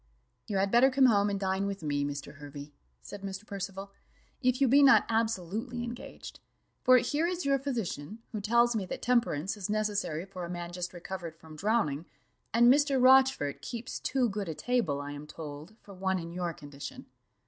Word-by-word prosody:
"You 200 - -1
had 195 +1 +1
better 245 +3 +6
come 270 0 +4
home 205 -4 +4
and 200 -1 -2
dine 190 0 0
with 195 -3 -5
me, 145 -1 0
Mr. 145 +1 -5
Hervey," 145 0 -9 0.3
said 70 - -9
Mr. 195 +1 -6
Percival, 195 -1 -6 0.5
"if 255 -1 +2
you 275 - +4
be 275 +4 +6
not 275 -1 +7
absolutely 225 +1 -1
engaged; 240 +1 -8 0.4
for 255 0 +7
here 290 +7 +1
is 360 -2 -3
your 275 -1 +3
physician, 220 - -4
who 215 -3 -4
tells 235 +3 +3
me 210 - 0
that - - -6
temperance 230 -9 +1
is 205 -2 -5
necessary 205 -6 -1
for 190 -2 -8
a 170 - -5
man 175 -1 -5
just 180 0 -4
recovered 175 -2 -7
from 160 -1 -13
drowning, 175 -6 0 0.4
and 235 +2 +5
Mr. 285 -2 +2
Rochfort 260 - +5
keeps 240 0 -5
too 260 -2 +1
good 200 -4 -3
a 160 - -4
table, 230 - 0
I 145 0 -5
am 145 +1 -8
told, 155 +5 -9
for 200 - -12
one 190 0 0
in 170 -1 -6
your 175 0 -2
condition." 150 - -9
200 Hz, 190 wpm, -30 LUFS, 170-240 Hz, 0.5 s, not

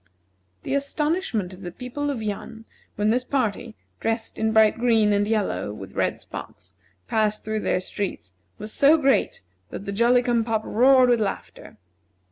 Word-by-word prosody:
The - - -3
astonishment 280 - -1
of 185 - -13
the 180 - -5
people 250 +9 -5
of 250 -6 -3
Yan, 220 +2 -6 0.3
when 210 +1 +1
this 250 +2 +1
party, 235 -4 -2 0.2
dressed 225 0 -3
in 220 0 +1
bright 220 0 +4
green 225 -3 +3
and 205 0 +1
yellow, 210 - -1
with 95 -2 -9
red - - -1
spots, 90 - -10 0.3
passed 215 -1 0
through 215 0 -1
their 205 - 0
streets, 185 - -5 0.2
was 215 +1 -8
so 290 +3 +5
great 270 - +1 0.3
that 200 - -7
the 200 - -3
Jolly 240 +4 +3
cum 240 -2 +1
pop 220 -1 -1
roared 255 +2 +5
with 235 -2 +2
laughter. 200 -2 -5
220 Hz, 165 wpm, -24 LUFS, 205-250 Hz, 0.3 s, so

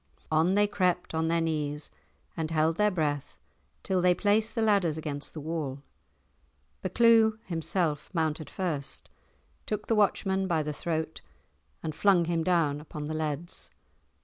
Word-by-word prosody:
On 160 +5 +3
they 205 0 +5
crept 180 -4 0
on 160 0 +1
their 165 0 +2
knees 150 -2 -2 0.4
and 160 -2 -2
held 160 0 +2
their 210 0 +4
breath 150 -6 -2 0.5
till 185 -1 +1
they 180 0 +4
placed 215 +3 +2
the 230 - +1
ladders 195 -8 +3
against 150 -1 -5
the - - -4
wall. 145 -3 -4 1.0
Buccleuch 225 -2 +4
himself 165 -3 -1
mounted 160 -3 -1
first, 160 -7 -3 0.6
took 210 -1 -2
the - - +1
watchman 195 -2 +2
by 165 -4 +1
the 150 0 -3
throat 160 +1 -3 0.6
and 155 - -3
flung 185 0 +4
him 165 -1 0
down 160 -5 +2
upon 150 -1 -7
the 155 - -3
leads. 155 +2 -3
165 Hz, 150 wpm, -29 LUFS, 155-190 Hz, 1.0 s, they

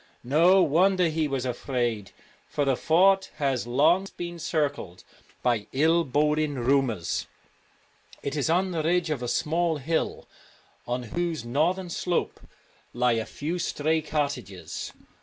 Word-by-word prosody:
No 170 +9 +5
wonder 180 +3 +3
he 155 -1 0
was 135 -3 -2
afraid, 120 -5 -2 0.4
for 145 - -1
the 135 -1 +2
fort 190 +7 +3
has 135 -5 -1
long 160 +10 +3
been 175 0 -5
circled 145 - -2 0.4
by 115 -4 +1
ill 160 +5 +3
boding 150 +1 +1
rumours. 125 -7 0 1.0
It 140 - -3
is 145 0 0
on 185 +3 +2
the 165 -3 -1
ridge 170 +1 +1
of 140 -5 -2
a 120 - -3
small 165 +5 0
hill, 160 +4 -2 0.6
on 125 +1 -2
whose 170 -7 -2
northern 170 +9 0
slope 175 +1 -1 0.5
lie 125 0 +2
a 115 -1 -1
few 165 +5 -4
stray 160 0 0
cottages. 145 - -4
150 Hz, 135 wpm, -26 LUFS, 125-170 Hz, 1.0 s, No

